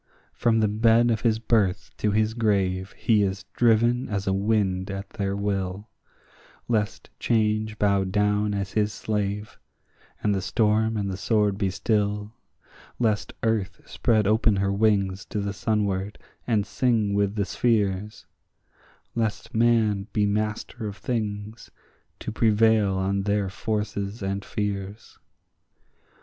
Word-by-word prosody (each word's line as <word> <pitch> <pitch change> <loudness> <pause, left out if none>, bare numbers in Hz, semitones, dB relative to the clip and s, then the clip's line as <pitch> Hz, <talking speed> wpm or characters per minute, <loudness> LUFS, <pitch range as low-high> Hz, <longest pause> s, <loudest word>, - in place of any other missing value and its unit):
From 115 -2 +2
the 110 - +3
bed 115 +3 +3
of 110 -3 0
his 110 -2 +2
birth 110 -4 0
to 105 - 0
his 110 +1 +1
grave 100 -4 0
he 110 -3 +3
is 95 -1 -1
driven 120 +2 +3
as 100 -2 -2
a 95 - +1
wind 95 -2 0
at 100 0 -5
their 100 -3 -2
will; 100 0 -3 0.8
Lest 105 -3 -1
Change 110 -1 +1
bow 100 -2 +2
down 105 +2 +1
as 100 -1 -3
his 105 -1 +1
slave, 105 0 -3 0.6
and 105 - +2
the 95 - -1
storm 110 +3 +1
and 100 -1 -1
the 95 - -4
sword 105 0 +1
be 100 -2 +1
still; 105 +1 -1 0.6
Lest 110 -3 0
earth 105 -5 0
spread 110 -3 +1
open 110 +1 +3
her 100 0 0
wings 100 -2 +1
to 105 - -4
the 100 0 -2
sunward, 100 -2 -1 0.3
and 110 -4 +2
sing 110 -1 +1
with 100 0 +1
the 100 -2 0
spheres; 105 -1 0 0.9
Lest 110 -2 -2
man 110 -3 +2
be 105 -1 +2
master 110 +2 -2
of 100 0 -7
things, 110 -2 -4 0.5
to - - -5
prevail 110 -2 +3
on 95 +1 0
their 100 -1 0
forces 105 0 -3
and 100 +1 -2
fears. 100 0 -5
105 Hz, 135 wpm, -25 LUFS, 100-110 Hz, 0.9 s, the